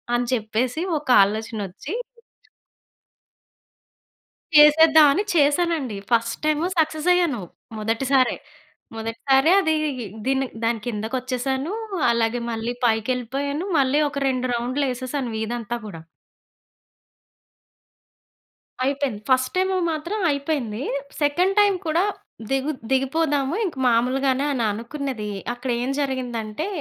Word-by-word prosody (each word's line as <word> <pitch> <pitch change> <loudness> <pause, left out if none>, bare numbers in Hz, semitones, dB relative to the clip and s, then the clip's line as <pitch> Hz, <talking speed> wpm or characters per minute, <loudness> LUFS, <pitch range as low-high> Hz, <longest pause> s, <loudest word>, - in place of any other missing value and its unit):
అని 240 0 0
చెప్పేసి 240 +5 -1 0.2
ఒక 295 - -18 0.2
ఆలోచనొచ్చి 215 - -4 2.6
చేసేద్దాం 310 +1 +8
అని 395 - 0
చేశానండి. 295 - +2
First 230 -1 +1
time 310 +1 +1
సక్ససయ్యాను. 315 - +2 0.4
మొదటిసారే. 255 +5 +1 0.6
మొదటిసారే 265 +7 +2
అదీ 320 -4 +1 0.5
దీని 270 0 +1 0.2
దాని 230 0 +1
కిందకచ్చేసాను. 255 - -2 0.4
అలాగే 235 +1 0
మళ్ళీ 225 +1 -3
పైకెళ్ళిపోయాను. 255 - -1
మళ్ళీ 275 +2 +2
ఒక 280 0 -4
2 255 -1 -1
రౌండ్లేసేసాను 255 +1 -2
వీధంతా 235 +1 -3
కూడా. 165 -6 -9 2.8
అయిపేయింది. 275 -6 -1
ఫస్ట్ 260 0 +3
టైము 375 +1 +1 0.2
మాత్రం 340 +7 -3
అయిపోయింది. 275 -6 -2 0.4
సెకండ్ 350 +7 +2
టైమ్ 410 -1 +4
కూడా 325 +3 +2 0.5
దిగు 270 +2 0 0.2
దిగిపోదాము 275 +2 +1
ఇంక 350 - -4
మాములుగానే 260 +3 +2
అని 245 -4 -1
అనుకున్నది. 235 0 -5 0.2
అక్కడేం 245 0 -2
జరిగిందంటే 250 - -3
265 Hz, 90 wpm, -23 LUFS, 235-295 Hz, 2.8 s, చేసేద్దాం